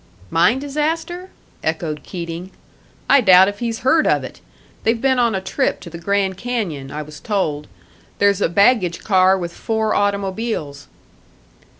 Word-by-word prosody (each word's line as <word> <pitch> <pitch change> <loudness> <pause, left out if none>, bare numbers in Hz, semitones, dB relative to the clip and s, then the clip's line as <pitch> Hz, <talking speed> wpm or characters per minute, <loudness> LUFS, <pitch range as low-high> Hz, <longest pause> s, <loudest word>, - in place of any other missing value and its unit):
"Mine 215 +9 +3
disaster?" 320 +6 -3 0.3
echoed 160 -1 -2
Keating. 170 0 -6 0.6
"I 280 - +6
doubt 190 -3 +7
if 205 0 -8
he's 230 -2 -3
heard 310 +5 +3
of - - +2
it. - - -10 0.4
They've 230 +1 +1
been 260 0 +2
on 235 -3 +2
a 190 - -2
trip - - -1
to 170 - -10
the 170 - -8
Grand 195 +1 0
Canyon, 190 - -3
I 150 +2 -5
was 150 0 -12
told; 155 -8 -2 0.5
there's 200 -1 +2
a - - +2
baggage 200 -2 +2
car 190 -1 +4
with 175 -2 -5
four 220 +1 -1
automobiles." 200 - -2
200 Hz, 155 wpm, -19 LUFS, 170-235 Hz, 0.6 s, doubt